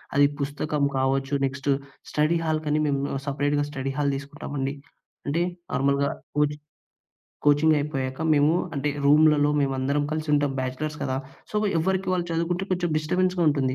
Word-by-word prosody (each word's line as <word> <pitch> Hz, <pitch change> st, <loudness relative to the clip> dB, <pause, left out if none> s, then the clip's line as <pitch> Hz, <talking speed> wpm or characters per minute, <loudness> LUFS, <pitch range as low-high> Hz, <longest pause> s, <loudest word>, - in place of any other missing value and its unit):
అది 145 Hz, 0 st, +6 dB
పుస్తకం 145 Hz, +1 st, -2 dB
కావచ్చు. 135 Hz, +1 st, 0 dB
నెక్స్టు 135 Hz, +1 st, -1 dB, 0.4 s
స్టడీ 155 Hz, +3 st, +2 dB
హాల్‌కని 155 Hz, -1 st, 0 dB
మేము 140 Hz, -2 st, 0 dB, 0.2 s
సపరేట్‌గా 145 Hz, +1 st, 0 dB
స్టడీ 135 Hz, -2 st, -3 dB
హాల్ 145 Hz, -1 st, +1 dB
తీసుకున్నామండి. 140 Hz, -1 st, -4 dB, 0.5 s
అంటే, 155 Hz, +4 st, +1 dB, 0.3 s
నార్మల్‌గా 140 Hz, +1 st, +2 dB, 0.3 s
కోచింగ్ 150 Hz, 0 st, +1 dB, 0.8 s
కోచింగ్ 145 Hz, +2 st, +5 dB
అయిపోయాక, 135 Hz, -2 st, -3 dB
మేము 145 Hz, +1 st, +4 dB, 0.2 s
అంటే 140 Hz, +1 st, -1 dB, 0.2 s
రూమ్‌లలో 150 Hz, 0 st, +5 dB
మేము 135 Hz, -1 st, +1 dB
అందరం 140 Hz, +3 st, +1 dB
కలిసి 155 Hz, 0 st, -3 dB
ఉంటాం. 145 Hz, -1 st, +2 dB
బ్యాచిలర్స్ 130 Hz, +4 st, -3 dB
కదా. 130 Hz, -, -1 dB, 0.3 s
సో, -, -, -3 dB, 0.2 s
ఎవరికీ 190 Hz, +3 st, 0 dB
వాళ్ళు 180 Hz, -1 st, 0 dB
చదువుకుంటే, 170 Hz, +3 st, -1 dB
కొంచెం 175 Hz, -1 st, 0 dB
డిస్టర్బెన్స్‌గా 180 Hz, +3 st, +1 dB
ఉంటుంది. 135 Hz, -3 st, +1 dB
145 Hz, 140 wpm, -25 LUFS, 140-155 Hz, 0.8 s, అది